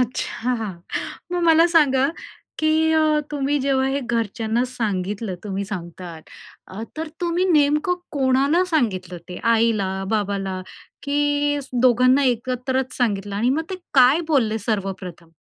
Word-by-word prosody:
अच्छा, 250 Hz, 0 st, -1 dB, 0.8 s
मग 350 Hz, -1 st, 0 dB
मला 330 Hz, 0 st, +6 dB
सांगा 280 Hz, -6 st, +3 dB, 0.5 s
की 310 Hz, -, +1 dB, 0.2 s
अ, 310 Hz, -1 st, +3 dB
तुम्ही 290 Hz, 0 st, 0 dB
जेव्हा 265 Hz, -1 st, +1 dB
हे 275 Hz, +1 st, -1 dB
घरच्यांना 230 Hz, -1 st, -1 dB
सांगितलं 205 Hz, -4 st, -3 dB
तुम्ही 200 Hz, -1 st, -3 dB
सांगता 175 Hz, -3 st, -7 dB, 0.5 s
अ, 195 Hz, +4 st, -8 dB
तर 320 Hz, 0 st, -4 dB
तुम्ही 350 Hz, +1 st, 0 dB
नेमकं 300 Hz, +3 st, +3 dB, 0.2 s
कोणाला 275 Hz, +5 st, +2 dB
सांगितलं? 190 Hz, -, -1 dB
ते 180 Hz, -, -7 dB, 0.2 s
आईला, 220 Hz, -4 st, +1 dB, 0.2 s
बाबाला 195 Hz, -3 st, -1 dB, 0.4 s
की 290 Hz, 0 st, +1 dB, 0.2 s
दोघांना 255 Hz, +2 st, +4 dB
एकत्रच 255 Hz, +1 st, -1 dB
सांगितलं? 205 Hz, -4 st, -1 dB
आणि 240 Hz, +5 st, +1 dB
मग 310 Hz, +4 st, +1 dB
ते 375 Hz, -, -2 dB, 0.2 s
काय 260 Hz, +4 st, +6 dB
बोलले 225 Hz, -7 st, +2 dB
सर्वप्रथम? 190 Hz, -6 st, -4 dB
250 Hz, 125 wpm, -22 LUFS, 205-290 Hz, 0.8 s, मला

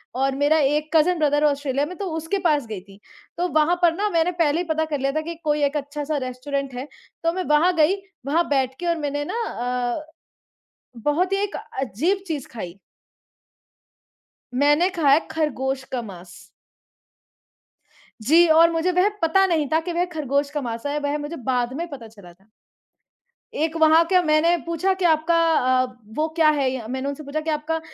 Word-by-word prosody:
और 270 Hz, +1 st, 0 dB
मेरा 290 Hz, +3 st, +3 dB
एक 300 Hz, +2 st, +1 dB
कज़िन 335 Hz, +2 st, +4 dB
ब्रदर 295 Hz, -1 st, +2 dB
है 300 Hz, -, +5 dB
ऑस्ट्रेलिया 280 Hz, 0 st, -1 dB
में 365 Hz, +4 st, -8 dB
तो 400 Hz, -, -4 dB
उसके 325 Hz, +5 st, -2 dB
पास 295 Hz, -5 st, +2 dB
गई 215 Hz, -3 st, -5 dB
थी। 195 Hz, +1 st, -17 dB, 0.4 s
तो 355 Hz, -, 0 dB
वहाँ 310 Hz, +3 st, +3 dB
पर 340 Hz, -2 st, +4 dB
ना 415 Hz, +2 st, 0 dB
मैंने 335 Hz, 0 st, +1 dB
पहले 330 Hz, -3 st, +1 dB
ही -, -, -2 dB
पता 315 Hz, 0 st, +1 dB
कर 295 Hz, -3 st, -3 dB
लिया 275 Hz, +1 st, 0 dB
था 310 Hz, -, +1 dB
कि 335 Hz, +1 st, -6 dB
कोई 295 Hz, -1 st, +1 dB
एक 285 Hz, +1 st, +1 dB
अच्छा 290 Hz, +1 st, -5 dB
सा 300 Hz, 0 st, -2 dB
रेस्टोरेंट 270 Hz, +1 st, -4 dB
है, 255 Hz, +4 st, -6 dB, 0.4 s
तो 330 Hz, -, +1 dB
मैं 370 Hz, +1 st, -2 dB
वहाँ 335 Hz, +5 st, +4 dB
गई, 325 Hz, +4 st, +4 dB, 0.3 s
वहाँ 325 Hz, +5 st, +1 dB
बैठ 265 Hz, -2 st, +1 dB
के 350 Hz, -, -5 dB
और 335 Hz, -, +1 dB
मैंने 290 Hz, -1 st, -2 dB
ना 470 Hz, -, -2 dB
अ, 250 Hz, -, -3 dB, 1.0 s
बहुत 350 Hz, +6 st, +1 dB
ही 390 Hz, -, +2 dB
एक 410 Hz, -, -4 dB, 0.3 s
अजीब 320 Hz, -, -1 dB
चीज़ 295 Hz, -5 st, -4 dB
खाई। 180 Hz, -7 st, -7 dB, 1.8 s
मैंने 295 Hz, +7 st, +3 dB
खाया 310 Hz, -5 st, +3 dB
खरगोश 270 Hz, -4 st, -2 dB
का 250 Hz, -, -2 dB
माँस। 185 Hz, -5 st, -11 dB, 1.8 s
जी, 325 Hz, +9 st, +5 dB
और 330 Hz, +1 st, +6 dB
मुझे 335 Hz, +2 st, 0 dB
वह 360 Hz, +2 st, +3 dB
पता 335 Hz, +4 st, +4 dB
नहीं 325 Hz, -5 st, +1 dB
था 320 Hz, -, +3 dB
कि 350 Hz, +1 st, -5 dB
वह 350 Hz, +1 st, +1 dB
खरगोश 280 Hz, -1 st, -1 dB
का 295 Hz, -1 st, -3 dB
माँस 230 Hz, -1 st, -5 dB
है, 285 Hz, +1 st, -1 dB
वह 290 Hz, 0 st, -1 dB
मुझे 295 Hz, +3 st, -6 dB
बाद 245 Hz, -1 st, 0 dB
में 340 Hz, +3 st, -3 dB
पता 260 Hz, -6 st, -9 dB
चला 200 Hz, -6 st, -15 dB
था। 195 Hz, +4 st, -30 dB, 1.1 s
एक 320 Hz, +2 st, -1 dB
वहाँ 320 Hz, +1 st, +6 dB
का 365 Hz, 0 st, +4 dB
मैंने 320 Hz, +2 st, +3 dB
पूछा 335 Hz, +3 st, 0 dB
कि 360 Hz, -, +1 dB
आपका 320 Hz, +1 st, +3 dB, 0.2 s
अ, 255 Hz, -2 st, +2 dB, 0.3 s
वो 310 Hz, +1 st, +1 dB
क्या 320 Hz, -2 st, +5 dB
है 280 Hz, -4 st, +1 dB
या 250 Hz, -4 st, -5 dB
मैंने 260 Hz, +3 st, -3 dB
उनसे 285 Hz, +2 st, -6 dB
पूछा 285 Hz, +2 st, -3 dB
कि, 320 Hz, -, -4 dB
"आपका 310 Hz, +1 st, -1 dB
300 Hz, 195 wpm, -23 LUFS, 270-330 Hz, 1.8 s, और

